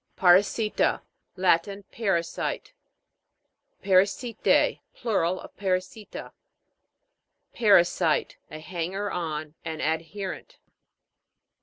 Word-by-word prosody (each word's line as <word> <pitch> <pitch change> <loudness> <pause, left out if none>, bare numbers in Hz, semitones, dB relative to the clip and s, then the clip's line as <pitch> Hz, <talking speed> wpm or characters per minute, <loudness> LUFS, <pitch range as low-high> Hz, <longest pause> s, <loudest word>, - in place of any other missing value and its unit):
PARASI'TA. 200 +4 +3 0.3
Latin. 190 +2 +1
Parasite. 195 - -2 1.1
PARASI'T^E. 200 +5 +2 0.2
Plural 185 -6 0
of - - -12
Parasita. 190 +2 -3 1.2
PA'RASITE. 185 -7 +3
A 155 - -8
hanger 180 +5 -4
on, 155 -3 -4
an 160 -1 -5
ad 160 +1 0
herent. 205 - -6
185 Hz, 70 wpm, -26 LUFS, 170-205 Hz, 1.2 s, PARASI'TA